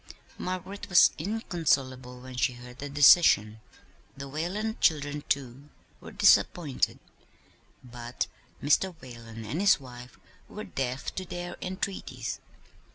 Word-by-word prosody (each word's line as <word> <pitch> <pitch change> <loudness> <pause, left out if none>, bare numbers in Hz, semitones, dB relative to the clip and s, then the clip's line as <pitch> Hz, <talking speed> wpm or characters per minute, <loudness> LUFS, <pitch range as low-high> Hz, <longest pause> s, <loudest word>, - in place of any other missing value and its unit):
Margaret 185 +2 -5
was 180 - +7
inconsolable 140 - -1
when 130 0 -10
she 125 0 +1
heard 125 +1 -12
the 145 - -5
decision. 135 - +6 0.6
The 140 0 -6
Whalen 185 - -3
children, 145 -2 +2
too, 135 +1 -2 0.3
were - - -11
disappointed; 150 -7 +3 0.9
but 120 -1 -4 0.4
Mr. 175 +6 +2
Whalen 115 -3 -10
and 145 - -3
his 200 -5 +5
wife 125 -2 -12 0.3
were - - -7
deaf 130 0 -4
to 185 - -4
their 175 0 -6
entreaties. 190 +1 -4
140 Hz, 115 wpm, -28 LUFS, 125-175 Hz, 0.9 s, was